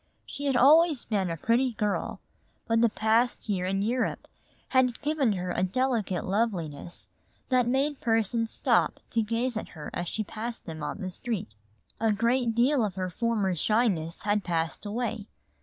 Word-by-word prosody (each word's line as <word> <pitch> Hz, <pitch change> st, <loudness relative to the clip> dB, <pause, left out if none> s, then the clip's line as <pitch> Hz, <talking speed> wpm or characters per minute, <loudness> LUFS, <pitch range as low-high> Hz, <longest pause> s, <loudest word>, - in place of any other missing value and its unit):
She 285 Hz, -, -5 dB
had 270 Hz, -3 st, +2 dB
always 300 Hz, +2 st, +5 dB
been 200 Hz, -5 st, 0 dB
a 165 Hz, -, -3 dB
pretty 240 Hz, +7 st, +2 dB
girl, 210 Hz, -2 st, -2 dB, 0.5 s
but 230 Hz, 0 st, +3 dB
the 235 Hz, -, +5 dB
past 225 Hz, +4 st, +1 dB
year 185 Hz, -3 st, 0 dB
in 195 Hz, +1 st, 0 dB
Europe 245 Hz, +4 st, -1 dB, 0.4 s
had 255 Hz, -2 st, +2 dB
given 290 Hz, -7 st, +2 dB
her 180 Hz, -1 st, -3 dB
a -, -, -1 dB
delicate 215 Hz, -2 st, 0 dB
loveliness 180 Hz, -7 st, -2 dB, 0.4 s
that 250 Hz, -2 st, +3 dB
made 275 Hz, +3 st, 0 dB
persons 225 Hz, 0 st, +1 dB
stop -, -, +2 dB
to 230 Hz, -, +2 dB
gaze 230 Hz, +2 st, -1 dB
at -, -, -4 dB
her 150 Hz, -, -7 dB
as 175 Hz, -, -3 dB
she 215 Hz, -, -2 dB
passed 225 Hz, +3 st, -6 dB
them 160 Hz, -2 st, -7 dB
on 205 Hz, -, -4 dB
the 185 Hz, -1 st, -4 dB
street. 190 Hz, -, -4 dB, 0.5 s
A 225 Hz, -1 st, +2 dB
great 235 Hz, +2 st, +1 dB
deal 250 Hz, +2 st, +3 dB
of 200 Hz, -4 st, -2 dB
her 185 Hz, -1 st, -3 dB
former 210 Hz, -1 st, 0 dB
shyness 180 Hz, -3 st, 0 dB
had 205 Hz, 0 st, +1 dB
passed 165 Hz, +3 st, -2 dB
away. 225 Hz, -1 st, -3 dB
225 Hz, 170 wpm, -28 LUFS, 190-245 Hz, 0.5 s, always